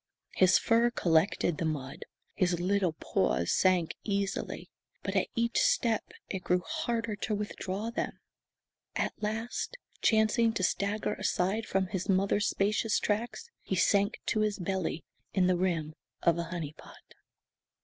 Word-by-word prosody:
His 185 -1 +5
fur 235 +1 +3
collected 170 -4 +2
the 165 - 0
mud. 140 -4 -4 0.3
His 180 -3 +1
little 185 -1 +1
paws 65 - 0
sank 185 -3 +3
easily, 200 -1 -2 0.3
but - - -3
at - - +2
each 235 0 +1
step 225 -3 +2 0.2
it 190 -2 -4
grew 180 0 +2
harder 235 -9 -1
to 210 +1 -1
withdraw 205 +1 -3
them. 235 - -3 0.8
At - - 0
last, 225 - -3 0.2
chancing 225 +1 +3
to 200 - -2
stagger 200 +3 0
aside 200 +5 0
from 190 0 +1
his 185 0 -4
mother's 195 +2 +2
spacious 215 +2 +1
tracks, 235 - -2
he 190 - -2
sank 200 +3 +2
to 215 - +1
his 215 -1 +1
belly 185 -3 -2 0.3
in 185 -2 +4
the 180 0 +3
rim 170 -4 0 0.3
of 170 0 +3
a 170 - -1
"honey 165 -3 -5
pot." - - -16
195 Hz, 145 wpm, -30 LUFS, 180-220 Hz, 0.8 s, His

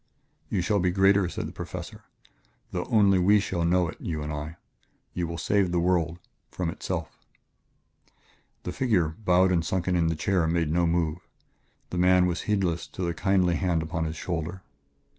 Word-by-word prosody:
"You 95 - 0
shall 100 +3 +1
be 90 0 +2
greater," 95 0 +3
said - - -4
the - - -8
Professor, - - -8 0.7
"though - - -2
only 100 -3 +4
we 100 +4 +5
shall 95 -4 -2
know 90 +1 +2
it 80 - -9
you 80 -3 -3
and 75 0 -4
I.... 75 +3 -6 0.6
You 90 -1 -2
will 85 0 -5
save 95 +2 +1
the 90 - +1
world 85 -1 +1 0.3
from 90 -3 -3
itself." - - -5 1.5
The 90 - -4
figure, 95 -7 +1
bowed 95 +1 +2
and 85 -2 +2
sunken 90 +2 -1
in 85 -2 +2
the 80 - 0
chair, 85 +1 +1
made 80 -2 0
no 85 +1 +2
move; 85 -1 0 0.7
the 90 - -2
man 90 0 +5
was 90 0 -1
heedless 95 -5 0
of 95 - -1
the 85 - -1
kindly 95 -2 +2
hand 85 -4 0
upon 80 0 -2
his 80 0 -4
shoulder. 85 +2 -4
90 Hz, 180 wpm, -27 LUFS, 85-95 Hz, 1.5 s, we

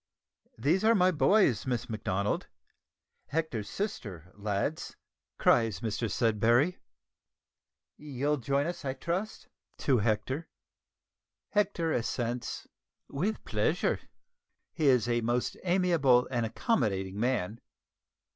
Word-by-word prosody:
"These 155 - +2
are 225 +1 +5
my 185 -2 +4
boys, 145 - +3
Miss 125 -1 -1
Macdonald 105 -2 -2 0.8
Hector's 140 -10 -2
sister, 100 - -5
lads," 105 +9 -3 0.4
cries 115 -6 +3
Mr 115 0 -2
Sudberry. 115 - +2 1.2
"You'll 145 0 -1
join 140 +3 0
us 175 -1 -4
I 135 -1 -2
trust?" 175 +9 -3 0.3
(to 130 -4 +2
Hector.) 125 +9 -1 1.0
Hector 190 -6 +1
assents 120 0 -2 0.4
"with 190 +10 -2
pleasure." - - 0 0.7
He 155 -3 +1
is 125 -4 +4
a 120 -1 +1
most 120 +2 0
amiable 170 -9 +3
and 120 -3 0
accommodating 100 - -1
man. 115 -3 -1
125 Hz, 100 wpm, -30 LUFS, 110-165 Hz, 1.2 s, are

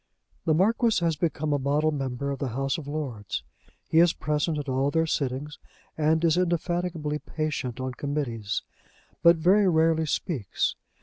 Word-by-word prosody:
The 155 - +3
Marquis 225 +6 +3
has 165 -1 +2
become 150 -1 -1
a 145 - +1
model 145 +3 +1
member 135 -1 -3
of 140 - -4
the 140 - -1
House 135 +4 -1
of 145 - -9
Lords. 120 - -4 0.4
He 160 - +3
is 170 0 +6
present 150 +1 -1
at 145 -1 -4
all 135 +1 +1
their 160 +2 +2
sittings, 145 0 -2 0.4
and 160 +1 +2
is 165 +1 +3
indefatigably 175 -3 -1
patient 150 -7 -3
on 130 0 -3
Committees, 125 -7 -3 0.6
but 170 0 +7
very 185 +5 +4
rarely 160 -1 +3
speaks. 140 - -1
150 Hz, 160 wpm, -26 LUFS, 135-165 Hz, 0.6 s, but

